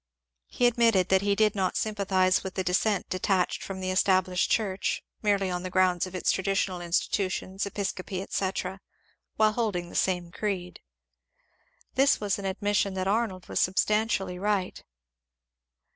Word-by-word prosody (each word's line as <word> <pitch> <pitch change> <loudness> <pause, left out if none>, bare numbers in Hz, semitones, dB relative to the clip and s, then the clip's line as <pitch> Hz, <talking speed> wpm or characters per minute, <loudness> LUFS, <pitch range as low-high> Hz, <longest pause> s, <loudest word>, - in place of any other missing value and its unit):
He 245 - 0
admitted 230 -6 +3
that 190 0 +4
he 200 0 +1
did 215 0 +3
not 190 -3 -1
sympathize 190 -3 +1
with 190 - -6
the 190 - -1
dissent 190 +3 +1
detached 185 0 0
from 190 -1 -6
the 185 0 -1
Established 185 -1 +2
Church 195 -4 0 0.2
merely 200 -3 +1
on 180 0 -2
the 185 - -5
grounds 185 -1 +2
of 185 - -9
its 185 - +1
traditional 190 -1 -1
institutions, 185 +2 -1
episcopacy, 190 -2 -4
etc., 190 -1 -3 0.5
while 215 0 +4
holding 210 -6 -2
the - - -12
same 180 -2 0
creed. 185 -3 -4 1.1
This 270 +2 +3
was 205 -1 -1
an 200 - -6
admission 200 0 0
that 185 0 -2
Arnold 200 -3 -1
was - - -1
substantially 190 -1 +1
right. 200 -2 -1
190 Hz, 145 wpm, -27 LUFS, 185-205 Hz, 1.1 s, that